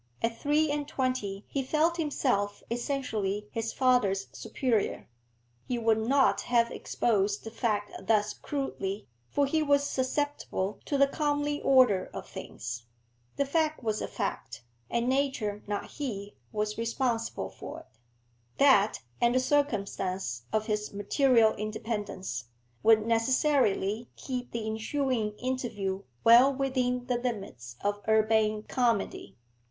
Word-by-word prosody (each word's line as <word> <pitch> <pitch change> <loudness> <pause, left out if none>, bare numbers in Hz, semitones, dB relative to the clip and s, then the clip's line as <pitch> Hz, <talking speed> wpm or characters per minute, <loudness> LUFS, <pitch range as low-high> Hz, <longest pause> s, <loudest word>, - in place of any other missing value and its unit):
At 230 0 +1
three 300 +1 +2
and 290 -1 -2
twenty 255 -8 -2
he 275 - -1
felt 315 +5 +1
himself 250 -10 0
essentially 220 -5 -2
his 225 0 -2
father's 210 -7 +2
superior. 235 -6 -1 0.6
He 250 - -1
would 225 -1 +2
not 265 +5 +3
have 235 -1 +2
exposed 205 -3 0
the 225 - -7
fact 210 -3 -1 0.2
thus 215 -1 +3
crudely, 215 -8 -4 0.2
for 285 - +2
he 315 +3 +1
was 285 -1 +3
susceptible 260 -7 -2
to 285 - 0
the 280 - +6
comely 290 0 -1
order 250 -9 +4
of - - -6
things. 120 0 -7 0.5
The 280 - +1
fact 310 0 0
was 215 -1 -1
a - - -2
fact, 120 - -4 0.3
and 235 +1 0
nature, 260 -6 0
not 205 -1 -2
he, 205 -8 -5 0.2
was 210 0 -2
responsible 230 0 -1
for - - -8
it. - - -19 0.7
That, 255 - +4 0.2
and 240 +1 +4
the - - +5
circumstance 195 - -1
of 215 0 +1
his 210 -1 -2
material 225 +2 +3
independence, 210 - -4 0.4
would 220 -1 +5
necessarily 230 -2 +2
keep 250 -2 -5
the 230 -2 -3
ensuing 220 0 -1
interview 225 -7 -2 0.2
well 240 +4 +8
within 255 -2 0
the 250 -1 0
limits 195 - -5
of 205 0 -1
urbane 215 -1 +3
comedy. 235 -5 -1
230 Hz, 130 wpm, -29 LUFS, 210-265 Hz, 0.7 s, well